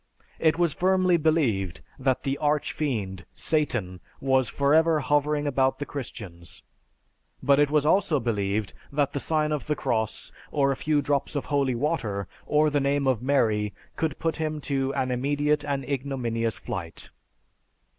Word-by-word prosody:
It 160 0 +3
was 170 -4 +2
firmly 185 +1 +3
believed 135 - +1 0.2
that 130 -1 +1
the 135 0 0
arch 150 0 +1
fiend 100 -11 -2
(Satan) 120 - -1 0.2
was 130 -3 +2
forever 155 +3 +3
hovering 145 +1 +1
about 135 -2 +2
the 145 - -4
Christians, 95 - -8 0.8
but 140 0 +4
it 145 -1 +4
was 150 -1 +2
also 160 -2 +3
believed 105 -3 -1 0.2
that 145 -1 0
the 140 - -1
sign 155 +1 0
of 150 -2 -2
the 150 - +1
cross, 110 -5 -2 0.2
or 140 -2 +2
a - - 0
few 150 +1 +1
drops 140 +1 -1
of 145 - -2
holy 135 -3 +2
water, 115 - -1 0.2
or 150 0 +3
the 145 - +2
name 140 0 +1
of 130 -5 +2
Mary, 110 -6 +1 0.2
could 160 -3 -1
put 165 -1 -1
him 155 -1 -2
to 135 -1 -1
an 130 -1 0
immediate 145 +4 +1
and 140 -2 -2
ignominious 125 -5 -2
flight. 85 -3 -7
140 Hz, 155 wpm, -26 LUFS, 120-150 Hz, 0.8 s, but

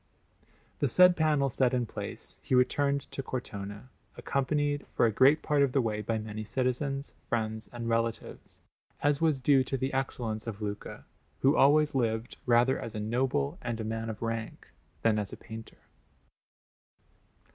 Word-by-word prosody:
The 145 - +2
said 180 +7 +6
panel 150 -4 +2
set 130 0 +2
in 125 -1 0
place, - - -7
he - - 0
returned 140 +2 +2
to - - -4
Cortona, 105 -3 -6 0.3
accompanied 145 +1 -1
for - - +4
a 115 - +3
great 135 +8 +5
part 150 -2 +2
of 140 -2 +2
the 140 - +3
way 110 -4 -1
by 110 +2 -1
many 110 0 -5
citizens, 135 +4 -2 0.2
friends, 110 -2 -2
and 120 -1 -5
relatives, 115 0 -3 0.4
as 145 0 +2
was 155 -4 +2
due 135 0 +4
to 135 +1 -2
the 130 +1 -2
excellence 120 -5 -2
of 110 -3 -5
Luca, 105 -1 -6 0.4
who 135 +2 +4
always 150 +2 +5
lived 115 -3 -1
rather 120 +2 +4
as 115 - -6
a - - -2
noble 135 - -1
and 120 -2 -3
a - - -2
man 115 +1 -3
of 110 0 -6
rank 115 -1 -4 0.3
than 110 -2 +3
as 100 -1 -3
a - - -8
painter. 110 0 -10
125 Hz, 165 wpm, -29 LUFS, 110-140 Hz, 0.4 s, said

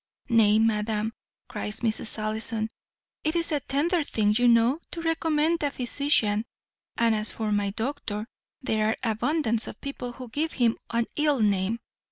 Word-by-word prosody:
"Nay, 220 -3 +5
madam," 220 0 +1 0.3
cries 210 +1 -3
Mrs. 225 -1 0
Ellison, 220 +1 -2 0.5
"it 310 +2 0
is 335 0 0
a 295 - +2
tender 310 +6 +1
thing, 210 -6 +1
you 245 +2 +4
know, 235 +5 +4
to 340 - -6
recommend 325 0 +1
a 290 - +1
physician; 245 -5 +1 0.5
and 230 -1 +3
as 215 0 0
for 220 -1 -3
my 205 -1 +1
doctor, 220 -1 -3 0.4
there 215 -3 +1
are 220 - 0
abundance 235 -1 +1
of - - -8
people 250 -3 -5
who 255 0 -8
give 310 +7 -1
him 235 -3 +2
an 235 0 +1
ill 295 -3 +2
name. 205 0 +2
230 Hz, 160 wpm, -27 LUFS, 215-290 Hz, 0.5 s, Nay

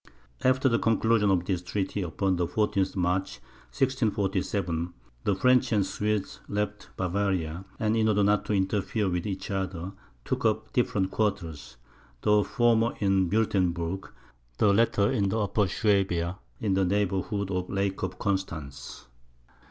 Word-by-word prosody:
After 130 +1 +3
the 115 -2 +2
conclusion 115 -1 +2
of 90 -2 +2
this 90 -2 -1
treaty, 95 +2 -2
upon 95 +2 0
the 85 -1 0
14th 100 +1 0
March, 90 +1 0 0.3
1647, 100 -8 0 0.3
the 100 - +2
French 125 +4 +3
and 105 -3 +3
Swedes 105 0 -2
left 105 0 -3
Bavaria, 90 -2 -1
and 110 0 +1
in 110 -1 +2
order 105 -1 +3
not 105 +1 +3
to - - -1
interfere 100 +2 0
with 90 +2 -1
each 95 0 -4
other, 95 -2 -3 0.3
took - - -2
up 110 -1 0
different 100 -6 +1
quarters; 80 - -2 0.5
the 105 0 +4
former 120 -1 +2
in 95 -3 +2
Wuertemberg, 95 -4 0 0.5
the 100 -2 +4
latter 105 -2 +3
in 100 - +1
Upper 105 -2 +1
Suabia, 95 -3 +1 0.2
in 100 - 0
the 95 0 +2
neighbourhood 100 +1 0
of 90 -1 -1
the - - -7
Lake 100 0 -1
of 95 0 -3
Constance. 80 -12 -4
100 Hz, 145 wpm, -27 LUFS, 90-105 Hz, 0.5 s, the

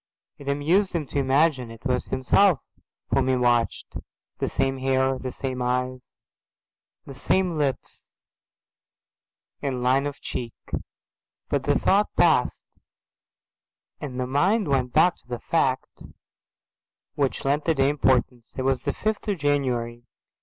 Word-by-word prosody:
It 140 - -11
amused 165 +8 +2
him 165 -4 -1
to 145 - -1
imagine 135 -2 +2
it 115 +2 -13
was 125 -2 0
himself 145 +6 +3 0.5
whom - - +2
he 130 - +3
watched, 120 -2 0 0.4
the - - -1
same 135 0 -1
hair, 130 0 +1
the 130 - -5
same 130 -1 -4
eyes, 125 +1 -1 1.1
the 140 - -9
same 180 +6 0
lips 140 -4 -3 1.4
and 130 -3 -2
line 135 +3 +3
of 145 - -7
cheek. 120 -2 -5 1.0
But - - 0
the - - +3
thought 205 +2 +3
palled, 160 -8 +4 1.5
and 130 -4 -6
the 125 - 0
mind 185 - +2
went 130 -3 +1
back 165 +5 +4
to - - -17
the 120 -1 -4
fact 130 0 -1 1.1
which 140 -2 -1
lent 145 +2 +1
the 165 - +2
day 135 0 +3
importance. 125 -4 +1
It 130 - -1
was 135 -1 +1
the - - 0
fifth 215 +1 -2
of 205 -2 0
January. 125 -6 -1
135 Hz, 140 wpm, -25 LUFS, 125-150 Hz, 1.5 s, palled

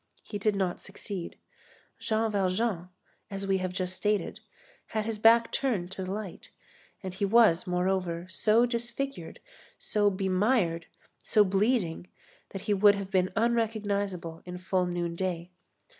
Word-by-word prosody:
He 205 - -6
did 210 0 +1
not 190 -3 -1
succeed. 195 -2 -7 0.6
Jean 220 0 0
Valjean, 190 -2 0 0.4
as 195 -1 -4
we 195 -1 +1
have 185 -1 -2
just 185 0 -2
stated, 210 +1 -1 0.5
had 215 -1 -2
his 220 -1 -3
back 230 +1 +5
turned 205 -10 -1
to 190 - -5
the 185 - -4
light, 205 -3 -6 0.5
and 185 -1 -5
he 195 - -4
was, 200 -5 +4
moreover, 180 -1 0
so 215 +5 +3
disfigured, 240 +3 -4 0.4
so 205 -1 +1
bemired, 190 -2 +1 0.3
so 210 - +4
bleeding 195 -3 +1 0.4
that 195 - -7
he 210 - +1
would 205 +1 +6
have 195 -1 -6
been 185 -1 +2
unrecognizable 205 -7 -1
in 180 0 -7
full 185 0 0
noonday. 175 0 -3
195 Hz, 140 wpm, -29 LUFS, 180-215 Hz, 0.6 s, would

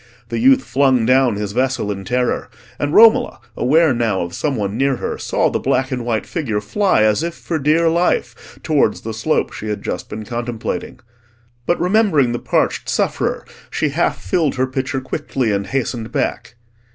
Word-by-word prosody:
The - - -2
youth 265 +2 +5
flung 130 -4 +2
down 130 -2 +3
his 105 -1 -3
vessel 130 -2 0
in 95 -1 -6
terror, 125 +3 -1 0.3
and 145 - -1
Romola, 230 - +5 0.2
aware 155 +3 +3
now 115 -5 0
of 85 0 -5
some 140 - -1
one 100 -2 -2
near 135 +2 +1
her, - - -4
saw - - 0
the - - -1
black 135 +1 0
and 125 -2 -2
white 115 -2 -1
figure 125 -11 -2
fly 185 - +1
as 110 +4 +2
if 170 0 -3
for 165 -2 -3
dear 155 +4 +3
life 170 +2 -1
towards 155 -3 +1
the 115 - -5
slope 110 +8 -1
she 110 - -7
had 105 -1 -4
just - - -4
been 110 0 -6
contemplating. 120 0 -4 0.7
But 175 - +1
remembering 180 - +3
the 120 - -2
parched - - 0
sufferer, - - -1 0.2
she - - -1
half - - 0
filled 145 - 0
her 130 0 +1
pitcher 130 +1 -3
quickly 130 -3 -2
and 100 -1 -1
hastened 120 -3 -3
back. 120 - -2
130 Hz, 180 wpm, -19 LUFS, 110-155 Hz, 0.7 s, youth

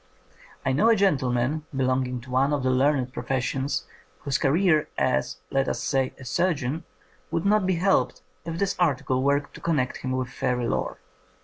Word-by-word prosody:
I - - +2
know 215 +12 +4
a 230 - +6
gentleman 140 - +1
belonging 130 -1 0
to 125 +1 -12
one 135 +3 +2
of 140 -3 0
the 130 - +2
learned 130 -1 +2
professions 135 0 -1 0.4
whose 140 -2 -1
career 155 +1 +3
as, - - 0
let 135 0 +1
us - - -3
say, 135 -2 0
a 130 - -11
surgeon 155 +1 0 0.4
would 165 - -1
not 205 -1 +3
be 190 - +2
helped 190 +3 +1 0.2
if 165 0 -4
this 200 +2 0
article 130 -6 +1
were 140 +1 +3
to 145 - -14
connect 150 -7 0
him 130 0 -3
with 130 -1 -2
fairy 125 0 -1
lore. - - -2
135 Hz, 175 wpm, -25 LUFS, 130-165 Hz, 0.4 s, a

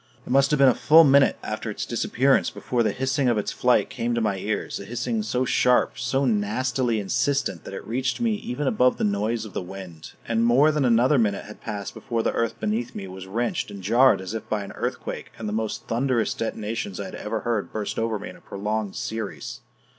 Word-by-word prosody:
It - - -7
must 135 +1 +4
have 150 - +2
been 135 0 +6
a 130 - +6
full 160 +6 +6
minute 140 -2 +5
after 110 +1 -4
its 105 - -4
disappearance 130 +3 +2
before 125 -2 -2
the 110 -2 +2
hissing 130 +3 0
of 120 - +2
its 105 - -1
flight 125 0 +2
came 120 -2 -1
to - - +1
my 105 -4 0
ears 105 +2 -3
a 100 - -8
hissing 120 - -2
so 130 -12 -1
sharp, 125 +2 +2
so 130 +3 0
nastily 120 +2 0
insistent 100 - -1
that - - -8
it - - -7
reached 130 +3 -1
me 235 -2 +1
even 150 -9 -4
above 125 -1 +3
the - - -2
noise 105 +2 0
of 105 - -10
the - - -2
wind. 90 -3 -9
And 115 0 +1
more 130 +6 +5
than 150 -3 +1
another 125 +4 +4
minute 105 -3 0
had 105 +1 -12
passed 100 -3 -5
before 115 -1 -2
the - - 0
earth 115 -1 -1
beneath 115 +3 -2
me 95 - -5
was 95 0 -9
wrenched 115 +3 -1
and 100 -2 -9
jarred 120 +4 +5
as 95 +3 -6
if 110 -1 -6
by 105 -2 -1
an 100 - -8
earthquake - - -5
and 110 - -5
the 105 - -3
most 110 0 -3
thunderous 120 -1 0
detonations 110 -3 -4
I 100 - -3
had 95 - -8
ever 110 +1 -3
heard 115 -4 -1
burst 105 -2 -3
over 115 -1 0
me 100 - -7
in - - -11
a - - -17
prolonged 105 0 -3
series. 110 -2 -5
115 Hz, 225 wpm, -25 LUFS, 105-130 Hz, -, been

